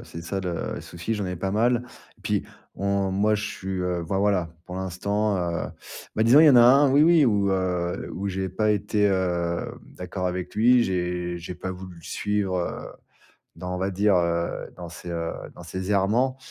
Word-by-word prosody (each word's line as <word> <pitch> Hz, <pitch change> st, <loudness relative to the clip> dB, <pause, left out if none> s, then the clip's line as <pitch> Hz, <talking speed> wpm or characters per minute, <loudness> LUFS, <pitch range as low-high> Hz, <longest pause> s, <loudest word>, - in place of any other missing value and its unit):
c'est 85 Hz, -, -9 dB
ça 95 Hz, +3 st, -3 dB
le 90 Hz, -2 st, -3 dB
souci, 90 Hz, +7 st, -4 dB
j'en 105 Hz, -2 st, -3 dB
ai 90 Hz, -1 st, -4 dB
pas 95 Hz, +2 st, -2 dB
mal. 120 Hz, +3 st, +2 dB, 0.4 s
Puis -, -, 0 dB, 0.3 s
on 100 Hz, -1 st, 0 dB
moi, 105 Hz, +2 st, +2 dB
je 105 Hz, -, -3 dB
suis, 95 Hz, -2 st, -6 dB
heu 90 Hz, -1 st, -1 dB
enfin 95 Hz, +4 st, -2 dB
voilà, 95 Hz, -4 st, +1 dB
pour 90 Hz, -, -8 dB
l'instant, 100 Hz, +3 st, -1 dB
heu 85 Hz, -1 st, -2 dB, 0.5 s
bah 110 Hz, -, +3 dB
disons, 130 Hz, +6 st, +7 dB
il 160 Hz, -, +8 dB
y -, -, +9 dB
en 130 Hz, -, +6 dB
a 120 Hz, -, +9 dB
un, 135 Hz, +3 st, +6 dB
oui, 145 Hz, +3 st, +5 dB
oui, 165 Hz, -3 st, +6 dB
où, 100 Hz, -4 st, +2 dB
heu, 90 Hz, -2 st, -1 dB
où 100 Hz, +2 st, -4 dB
j'ai 95 Hz, 0 st, -2 dB
pas 105 Hz, +3 st, +1 dB
été 105 Hz, +1 st, 0 dB
hem, 90 Hz, -3 st, 0 dB, 0.2 s
d'accord 90 Hz, 0 st, -4 dB
avec 90 Hz, 0 st, -3 dB
lui. 120 Hz, +2 st, +5 dB
J'ai 90 Hz, -2 st, -2 dB
j'ai 90 Hz, +1 st, -7 dB
pas 95 Hz, -, -5 dB
voulu 95 Hz, -1 st, -8 dB
le -, -, -16 dB
suivre, 100 Hz, -1 st, -1 dB
heu, 85 Hz, -, -4 dB, 0.7 s
dans, 90 Hz, +2 st, -5 dB
on -, -, -4 dB
va 95 Hz, +1 st, -1 dB
dire, 100 Hz, 0 st, +3 dB
heu, 85 Hz, -1 st, -1 dB
dans 85 Hz, -1 st, -8 dB
ses 90 Hz, +1 st, -9 dB
heu, 85 Hz, -1 st, -2 dB, 0.2 s
dans -, -, -11 dB
ses 95 Hz, +3 st, -4 dB
errements. 115 Hz, +7 st, +2 dB
95 Hz, 205 wpm, -25 LUFS, 90-105 Hz, 0.7 s, y